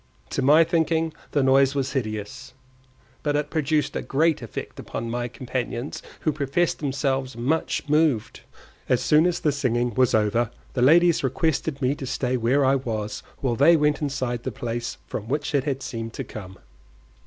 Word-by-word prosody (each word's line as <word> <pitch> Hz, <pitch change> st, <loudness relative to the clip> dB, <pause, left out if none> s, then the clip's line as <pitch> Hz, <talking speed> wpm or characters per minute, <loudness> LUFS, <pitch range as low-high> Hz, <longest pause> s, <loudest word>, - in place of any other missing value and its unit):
To -, -, -1 dB
my 150 Hz, +5 st, +6 dB
thinking 165 Hz, -1 st, +1 dB, 0.2 s
the 145 Hz, -, +1 dB
noise 135 Hz, +1 st, +4 dB
was 135 Hz, -2 st, -1 dB
hideous, 110 Hz, 0 st, -4 dB, 0.7 s
but 145 Hz, -1 st, 0 dB
it 150 Hz, 0 st, -1 dB
produced 155 Hz, -1 st, 0 dB
a -, -, -1 dB
great 155 Hz, +2 st, +1 dB
effect 115 Hz, -, -7 dB
upon 115 Hz, 0 st, -5 dB
my 120 Hz, 0 st, -2 dB
companions, 125 Hz, +1 st, -4 dB, 0.2 s
who 155 Hz, -, +1 dB
professed 150 Hz, +4 st, 0 dB
themselves 135 Hz, -3 st, -1 dB
much 145 Hz, +6 st, -1 dB
moved. 150 Hz, -7 st, +1 dB, 0.5 s
As 125 Hz, 0 st, +2 dB
soon 155 Hz, +6 st, +5 dB
as 175 Hz, -, -1 dB
the 150 Hz, -, +2 dB
singing 125 Hz, -4 st, 0 dB
was 125 Hz, +1 st, +3 dB
over, 110 Hz, +2 st, +2 dB, 0.2 s
the 125 Hz, -, -1 dB
ladies 165 Hz, +5 st, +5 dB
requested 140 Hz, +1 st, -1 dB
me 130 Hz, +2 st, +3 dB
to 140 Hz, -2 st, -6 dB
stay 125 Hz, 0 st, -1 dB
where 125 Hz, +4 st, +2 dB
I 135 Hz, +1 st, +4 dB
was 110 Hz, -5 st, -4 dB, 0.2 s
while 125 Hz, -4 st, 0 dB
they 165 Hz, +7 st, +6 dB
went 150 Hz, 0 st, +1 dB
inside 130 Hz, -4 st, -2 dB
the -, -, -4 dB
place 120 Hz, -3 st, -4 dB
from 105 Hz, -, -6 dB
which 145 Hz, +4 st, -2 dB
it 140 Hz, -2 st, +1 dB
had 135 Hz, -2 st, -2 dB
seemed 115 Hz, -1 st, -5 dB
to 135 Hz, -, -4 dB
come. 95 Hz, -5 st, -9 dB
135 Hz, 175 wpm, -24 LUFS, 120-150 Hz, 0.7 s, my